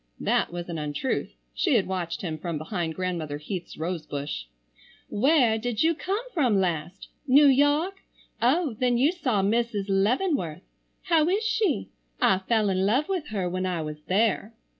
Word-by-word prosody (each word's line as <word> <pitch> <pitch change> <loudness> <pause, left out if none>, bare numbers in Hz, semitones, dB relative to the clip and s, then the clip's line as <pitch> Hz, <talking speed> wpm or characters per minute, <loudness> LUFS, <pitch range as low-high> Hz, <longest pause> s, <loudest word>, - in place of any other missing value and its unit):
That - - +1
was 175 0 -5
an 170 -2 -4
untruth. 150 - -2 0.2
She 325 -9 +1
had 210 - +3
watched 180 -2 -3
him 160 -3 -3
from 170 0 -3
behind 160 0 -3
Grandmother 170 -5 -3
Heath's 175 +4 -6
rose 165 0 -3
bush. 140 - -4 0.6
"Where 245 -1 +3
did 235 +1 -1
you 330 +1 +4
come 395 +8 -3
from 245 - +2
last? 175 0 -2 0.2
New 280 +3 +7
York? 290 +7 +3 0.4
Oh, 275 +4 +2
then 245 -1 +2
you 275 +6 +4
saw 250 - 0
Mrs. 220 -1 0
Leavenworth. 195 - +1 0.4
How 330 -3 +3
is 405 +4 +1
she? 445 -1 0 0.3
I 190 - +4
fell 215 +1 +1
in 185 0 +1
love 250 - +2
with 360 -6 -2
her 195 -4 -2
when 185 +1 -2
I 175 -3 -2
was 150 0 -7
there." 215 +3 +1
210 Hz, 165 wpm, -26 LUFS, 175-280 Hz, 0.6 s, New